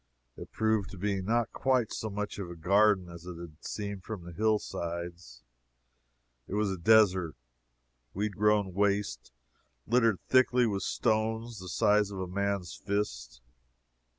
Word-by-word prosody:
It - - -10
proved 110 -3 +1
to 95 - -10
be 100 +1 -1
not 115 +3 0
quite 130 -4 +1
so 110 - -3
much 105 0 -4
of 95 -3 -5
a 85 - -7
garden 95 +2 +3
as 85 0 -11
it 90 -2 -7
had 85 -2 -11
seemed 100 -3 -5
from 105 -5 -6
the 85 - -9
hill 110 +4 +2
sides. 85 -9 -6 1.0
It 100 - -4
was 105 -2 +1
a 95 - -3
desert, 95 -4 +4 0.8
weed 100 +1 -2
grown 105 -2 +2
waste, 100 -11 0 0.5
littered 115 -3 +3
thickly 125 -1 +4
with 100 -4 -1
stones 110 +1 -1
the 90 0 -8
size 105 +1 +3
of 100 -2 -6
a 95 - -2
man's 100 -1 -2
fist. - - -3
100 Hz, 150 wpm, -30 LUFS, 90-110 Hz, 1.0 s, desert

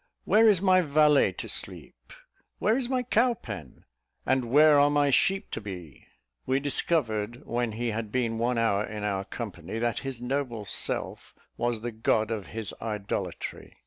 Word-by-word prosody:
where 225 +1 +5
is 195 -3 +3
my 185 -1 +5
valet 150 -2 +4
to - - -7
sleep? - - -4 0.5
where 220 - +2
is 255 -1 -1
my 255 -1 0
cow 245 0 +2
pen? 95 - -9 0.4
and 130 -1 +1
where 150 +2 +6
are 145 0 +5
my 145 -1 +2
sheep 195 +8 +1
to - - -4
be?" 90 -8 -9 0.4
We 130 +1 +2
discovered 120 -6 -1
when 120 -2 -1
he 120 +2 -2
had 110 -1 -4
been 115 -2 -1
one 120 +1 0
hour 110 -3 +2
in 105 -1 -6
our 100 -2 -1
company, 100 -4 -6
that 120 -1 -1
his 135 -3 -6
noble 125 -3 -3
self - - -2 0.2
was 120 -2 -1
the 120 +1 -4
god 110 0 0
of 105 -4 -4
his 110 -3 -4
idolatry. 100 -5 -5
120 Hz, 170 wpm, -27 LUFS, 110-145 Hz, 0.5 s, where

